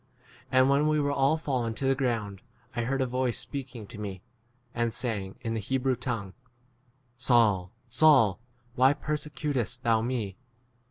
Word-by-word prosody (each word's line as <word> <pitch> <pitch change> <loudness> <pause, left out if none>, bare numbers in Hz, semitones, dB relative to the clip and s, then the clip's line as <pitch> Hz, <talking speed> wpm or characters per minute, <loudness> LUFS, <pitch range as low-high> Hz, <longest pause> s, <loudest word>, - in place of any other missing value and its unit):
14 - - -37
And, 130 - +6
when 145 +2 +3
we 155 0 +2
were 145 -1 +1
all 140 +3 +2
fallen 125 -7 -2
to 135 - -3
the 135 - +4
ground, 115 -7 -2 0.3
I 120 - -1
heard 135 +2 0
a - - +2
voice 125 -1 -1
speak 135 -2 -6
ing 110 -3 -7
to 105 +1 -11
me, 95 -3 -6 0.5
and 120 -1 -1
saying, 105 -6 -3
in 115 -2 -2
the 115 - -1
Hebrew 130 +4 0
tongue, 115 -6 -4 0.9
Saul, 110 -8 +3 0.2
Saul, 125 -5 +5 0.3
why 130 +2 +5
persecutest 145 -5 -3
thou 115 -1 +3
me 110 -5 -2
125 Hz, 165 wpm, -28 LUFS, 110-135 Hz, 0.9 s, And